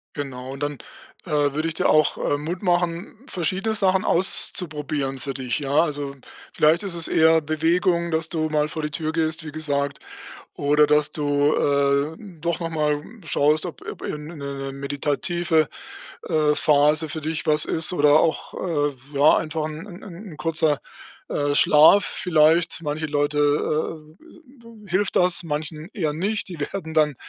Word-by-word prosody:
Genau, 130 -3 -6
und 135 +1 -6
dann, 145 -1 -3 0.5
äh, 175 - -8
würde 150 +1 +1
ich 165 - -2
dir - - 0
auch, 155 -1 +3
äh, 145 - -1
Mut 170 +6 -5
machen, 175 +3 -1
verschiedene 190 +6 -1
Sachen 190 0 +2
auszuprobieren 150 -6 0
für 135 0 -4
dich, 130 -2 -3
ja? 140 0 +2
Also, 145 -3 -4 0.4
vielleicht 155 +5 +3
ist 190 -4 -4
es 165 -1 -2
eher 160 0 +4
Bewegung, 170 +3 0
dass 160 0 -1
du 155 -2 -1
mal 150 0 0
vor 155 - -5
die 150 0 -4
Tür 155 +2 -3
gehst, 160 0 -1
wie 155 - -6
gesagt, 145 -2 -2 0.6
oder 150 +1 +3
dass 150 0 +2
du, 145 0 +1
äh, 140 +2 +1 0.2
doch 170 +1 -2
noch 165 - -2
mal, 150 -2 0
hm, 225 +7 -15
schaust, 155 +1 +2
ob 175 - -8
ob, - - -8
äh, - - -4
'ne 150 +3 -9
'ne 140 -1 -5
meditative, 145 +4 -1 0.6
äh, 150 -1 +2
Phase 150 +2 +3
für 160 - -4
dich 160 +1 -3
was 150 0 +3
ist 160 +1 +3
oder 150 -3 +4
auch, 165 - -1
äh, 145 -5 -1 0.2
ja, 145 +2 +5
einfach 155 -1 -3
'n 155 +3 -7 0.2
'n 190 0 -10
'n 150 - -12
kurzer, 155 -2 +1 0.5
äh, 145 0 -1
Schlaf 155 +9 +6
vielleicht. 165 -1 +2
Manche 150 +1 -3
Leute, 145 0 -1 0.8
äh, - - -21
äh, 330 - -17 0.5
d - - -16
hilft 185 +3 0
das, 180 -1 +4
manchen 155 +1 -5
eher 160 -8 -1
nicht. 200 +7 -2
Die 175 - -8
werden 160 +2 -5
dann 150 -2 +2
155 Hz, 170 wpm, -23 LUFS, 145-170 Hz, 0.8 s, Schlaf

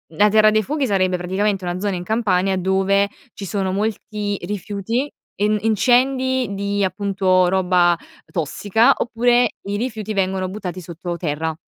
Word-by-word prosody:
la 210 +5 +5
Terra 215 0 +5
dei 215 0 +3
Fuochi 290 +3 -1
sarebbe 185 -2 +1
praticamente 190 +2 -1
una 175 +1 -3
zona 200 -2 -1
in 175 - -5
Campania 195 -3 +1
dove 195 +2 +2 0.2
ci 195 - -7
sono 190 -1 -2
molti 210 -1 -2
rifiuti, 210 +7 -3 0.3
en 210 +1 +2
incendi 255 +2 +2
di, 200 +1 -2
appunto, 185 -2 +2
roba 180 -2 +3 0.3
tossica, 205 - +2
oppure 240 0 +2
i 200 +1 -3
rifiuti 220 -3 -3
vengono 190 -1 0
buttati 185 -2 -6
sotto 175 0 -6
terra, 160 -1 -2
200 Hz, 145 wpm, -20 LUFS, 185-215 Hz, 0.3 s, la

